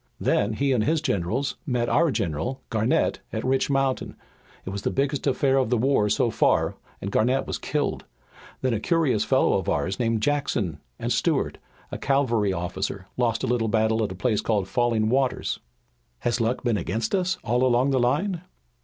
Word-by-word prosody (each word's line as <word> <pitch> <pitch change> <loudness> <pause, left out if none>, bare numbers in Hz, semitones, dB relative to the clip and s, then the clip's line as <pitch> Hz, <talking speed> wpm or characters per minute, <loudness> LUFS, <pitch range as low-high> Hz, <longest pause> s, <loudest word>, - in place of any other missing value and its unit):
Then 105 +2 +1
he 140 +5 0
and 120 -5 +2
his 160 +5 +2
generals 125 - -1
met 120 -3 0
our 170 +6 +3
general, 100 - -2
Garnett, 110 +2 +1
at - - -3
Rich 130 +1 +1
Mountain. 135 -1 0 0.5
It 95 - -4
was 100 0 -4
the - - 0
biggest 140 +1 -1
affair 135 0 +2
of 130 -4 +2
the 125 - +2
war 115 -3 +2
so 115 +3 +2
far, - - +2 0.3
and 100 - -4
Garnett 125 +6 +2
was - - -4
killed. - - -2 0.6
Then 130 -2 +2
a 110 - 0
curious 140 - +1
fellow - - +3
of - - -4
ours 95 - -1
named 115 -2 0
Jackson, 125 - 0 0.2
and - - -1
Stuart, - - 0 0.3
a - - -5
cavalry 120 -7 +1
officer, 95 +2 -3
lost 115 -2 0
a - - 0
little 120 -2 +1
battle 110 +1 +2
at 105 - -2
a - - -6
place 105 +2 0
called 105 -4 0
Falling 115 0 +1
Waters." 130 +2 0 0.6
"Has 120 - +1
the 115 - 0
luck 120 +3 -1
been 120 -4 +1
against 110 +5 -2
us 185 -1 +1
all 125 -1 +1
along 130 +2 +3
the 130 - +2
line?" 160 +9 +1
120 Hz, 190 wpm, -25 LUFS, 110-135 Hz, 0.6 s, our